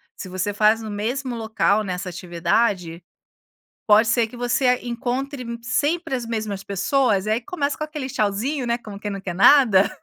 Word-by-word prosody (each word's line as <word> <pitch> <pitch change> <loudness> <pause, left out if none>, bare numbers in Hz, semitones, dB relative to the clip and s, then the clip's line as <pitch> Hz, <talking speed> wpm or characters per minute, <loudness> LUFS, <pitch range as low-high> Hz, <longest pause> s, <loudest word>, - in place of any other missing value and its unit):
Se 185 - -8
você 185 +3 -2
faz 215 +2 +3
no 220 - -6
mesmo 240 +5 -3
local, 220 -2 +1
né, 185 -2 -3
essa 180 +1 -5
atividade, 175 0 -1 0.8
pode 215 +2 +6
ser 235 -1 +2
que 235 - -13
você 250 +1 +2
encontre 250 +3 -3 0.2
sempre 290 +6 -1
as 250 -3 -2
mesmas 215 -4 -3
pessoas 200 +1 +1
e - - -3
aí 225 - +1
começa 285 +2 -2
com 305 - -3
aquele 300 -3 -6
tchauzinho, 240 +6 -1
né, 235 0 +1
como 210 -4 -10
quem 210 - -4
não 195 -1 -5
quer 180 -3 -4
nada. 205 -1 +6
225 Hz, 180 wpm, -22 LUFS, 200-255 Hz, 0.8 s, pode